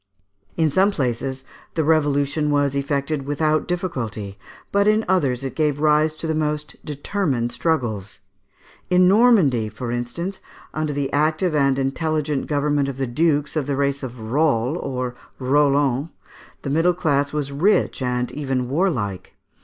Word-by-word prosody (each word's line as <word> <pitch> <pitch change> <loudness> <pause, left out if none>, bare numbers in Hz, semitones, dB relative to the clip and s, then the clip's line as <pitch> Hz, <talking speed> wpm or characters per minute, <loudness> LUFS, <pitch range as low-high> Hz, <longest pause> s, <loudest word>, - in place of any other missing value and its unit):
In 160 -2 +2
some 190 +7 +4
places, 130 - -2 0.3
the 160 - +1
revolution 145 -1 +2
was 145 -1 +2
effected 140 0 -2
without 155 +1 +1
difficulty, 115 - -4 0.3
but 200 +1 +3
in 215 +1 +3
others 140 -9 +1
it 135 - -4
gave 150 -2 0
rise 155 +1 +3
to 160 - -6
the 160 - 0
most 150 -1 -2
determined 145 - -2
struggles. 120 - -1 0.7
In 180 0 +5
Normandy, 190 - +4
for 115 +3 -5
instance, 170 +11 -4 0.3
under 155 -1 -1
the 140 -1 -2
active 155 +4 +1
and 140 -2 +2
intelligent 150 +1 -1
government 145 -1 +1
of 135 - -6
the 135 - -1
dukes 150 +4 0
of 150 -3 -1
the 140 -2 -1
race 140 0 0
of 125 -2 -7
Roll 125 +2 +1
or 125 -1 -3 0.2
Rollon, 140 +1 +2 0.5
the 140 - -3
middle 165 +4 +3
class 145 -5 +1
was 145 -2 -2
rich 170 +2 +2
and 125 -1 -1
even 130 -3 -2
warlike. 130 - -1
145 Hz, 145 wpm, -22 LUFS, 130-155 Hz, 0.7 s, In